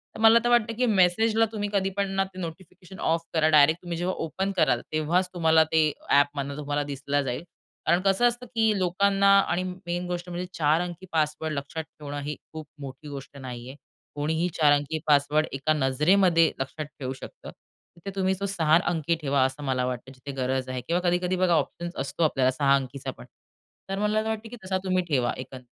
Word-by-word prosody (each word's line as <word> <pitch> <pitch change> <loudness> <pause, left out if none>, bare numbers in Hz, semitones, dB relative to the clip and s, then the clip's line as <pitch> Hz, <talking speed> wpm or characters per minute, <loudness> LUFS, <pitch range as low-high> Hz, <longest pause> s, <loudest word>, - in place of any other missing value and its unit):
तर - - -8
मला 225 +1 +7
तर 240 - +1
वाटतं, 235 -1 +3
की 250 - +2
मेसेजला 220 +2 +3
तुम्ही 205 -2 -3
कधी 195 -1 +1
पण 200 -1 0
ना 195 - +3
ते 185 - -9
नोटिफिकेशन 180 +2 -9
ऑफ 165 +1 +2
करा. 160 -1 +3
डायरेक्ट 155 +2 +5
तुम्ही 175 -2 -5
जेव्हा 180 +2 -1
ओपन 190 +5 -2
कराल 135 -8 +3
तेव्हाच 170 +4 +1
तुम्हाला 160 -2 +4
ते 155 -2 +3 0.2
ॲपमधनं 140 0 +2
तुम्हाला 145 0 -2
दिसलं 145 0 -2
जाईल. 125 +4 -3 0.4
कारण 170 +2 +3
कसं 195 +5 +3
असतं, 240 +1 -3
की 225 -3 +1
लोकांना 195 +2 +2
आणि 185 -2 0
मेन 180 -1 -4
गोष्ट 175 0 -4
म्हणजे 175 +1 -4
4 155 +2 +2
अंकी 180 +1 -6
पासवर्ड 155 0 -1
लक्षात 140 +3 -4
ठेवणं 145 -2 -8
ही 150 +1 -3 0.2
खूप 155 -1 -7
मोठी 135 +2 -9
गोष्ट 140 0 -9
नाहीये. 125 0 -8 0.4
कोणीही 160 +4 0
4 150 -2 +4
अंकी 145 +2 -1
पासवर्ड 150 +1 +3
एका 140 +3 +1
नजरेमध्ये 165 +5 +3
लक्षात 135 +3 -4
ठेवू 130 -1 -3
शकतं. 130 - -11 0.5
तिथे 195 +4 -7
तुम्ही 190 -1 +1
तो 200 - -2
6 160 -2 +4
अंकी 170 -1 0
ठेवा 140 -2 +2
असं 130 +3 -4
मला 130 -2 0
वाटतं 125 +1 -5
जिथे 140 +2 -8
गरज 130 0 -1
आहे 130 -1 -3
किंवा 175 +2 +1
कधी-कधी 180 +1 0
बघा 185 -1 +2
ऑप्शन्स 170 +3 -2
असतो 140 +5 -2
आपल्याला 130 -4 +2
6 140 +1 +3
अंकीचा 135 0 -4
पण. - - -11 0.6
तर 195 +1 -2
मला 210 +1 +1
असं 220 +1 -2
वाटतं, 220 0 -4
की 245 - -8
तसा 190 0 -1
तुम्ही 185 0 +1
ठेवा 130 -5 +1
एकं 130 +1 -8
160 Hz, 195 wpm, -26 LUFS, 140-185 Hz, 0.6 s, मला